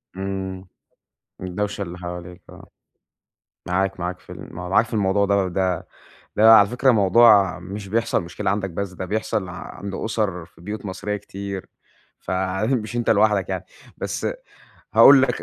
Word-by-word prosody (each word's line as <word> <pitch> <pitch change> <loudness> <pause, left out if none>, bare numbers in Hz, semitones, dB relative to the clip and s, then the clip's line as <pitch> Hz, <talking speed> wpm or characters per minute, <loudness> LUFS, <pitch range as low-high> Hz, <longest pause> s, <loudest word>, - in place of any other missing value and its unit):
إمم، 95 -1 -5 0.7
الدَوشة 100 +3 -3
اللي 90 -2 -5
حواليك، 90 0 -8
آه. - - -13 1.0
معاك، 95 +1 -1
معاك 90 +1 -3
في - - -13
ال - - -10
م - - -10
معاك 90 +5 +2
في - - -7
الموضوع 100 -1 +2
ده 100 -2 +2
ده 90 0 -1 0.5
ده 110 +1 +7
على 100 -2 +7
فكرة 125 +2 +2
موضوع 105 -2 +5
مش 95 +3 -8
بيحصل 115 0 0
مشكلة 90 +2 -3
عندك 100 -1 -1
بس، 95 +2 -4
ده 95 - -6
بيحصل 105 -1 -2
عند 95 +2 -8
أسر 100 -6 -2
في - - -23
بيوت 105 +4 -6
مصرية 100 +2 -3
كتير، 100 -1 -7 0.5
فمش 105 +6 -2
أنتَ 120 - 0
لوحدك 105 -2 +3
يعني. - - -3 0.3
بس - - -3 0.7
هاقول 135 -1 +8
لك 135 - 0
95 Hz, 150 wpm, -22 LUFS, 95-105 Hz, 1.0 s, هاقول